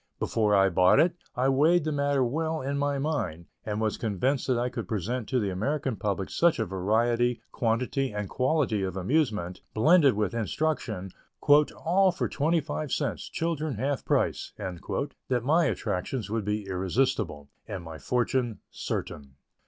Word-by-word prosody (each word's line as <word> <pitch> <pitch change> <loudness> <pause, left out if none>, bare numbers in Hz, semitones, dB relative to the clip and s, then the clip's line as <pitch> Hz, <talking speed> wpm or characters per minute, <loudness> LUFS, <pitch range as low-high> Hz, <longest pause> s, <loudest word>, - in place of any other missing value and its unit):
Before 105 -2 +1
I 95 0 +5
bought 90 0 +5
it, 170 +1 +4 0.2
I 125 +2 +1
weighed 155 +6 +4
the 155 - -1
matter 140 -2 +1
well 160 +5 -1
in 140 +1 -2
my 145 0 0
mind, 115 - -2 0.2
and 105 -1 -3
was 110 -1 -1
convinced 120 +6 0
that 130 -2 +2
I 120 +1 0
could - - -5
present 110 +2 -3
to 130 - +2
the 100 -4 -1
American 135 +6 -1
public 100 -1 -2
such 170 -1 +3
a 110 - 0
variety, 115 +5 +1
quantity 125 +3 0
and 105 -1 -3
quality 130 -5 +1
of 95 -1 -3
amusement, 105 - 0
blended 145 - +5
with 105 -1 0
instruction, 115 - -2 0.4
"all 170 +6 +4
for 180 - -2
twenty 160 +3 +1
five 150 -1 -4
cents, - - -2
children 155 -4 -2
half 135 +5 -1
price," - - 0
that 120 - -3
my 160 +6 +3
attractions 105 - -2
would 110 -2 -1
be 105 0 -1
irresistible, 95 - -1 0.2
and 100 -5 -5
my 80 -1 -8
fortune 125 -2 0
certain. 70 -2 -5
120 Hz, 160 wpm, -28 LUFS, 100-145 Hz, 0.4 s, I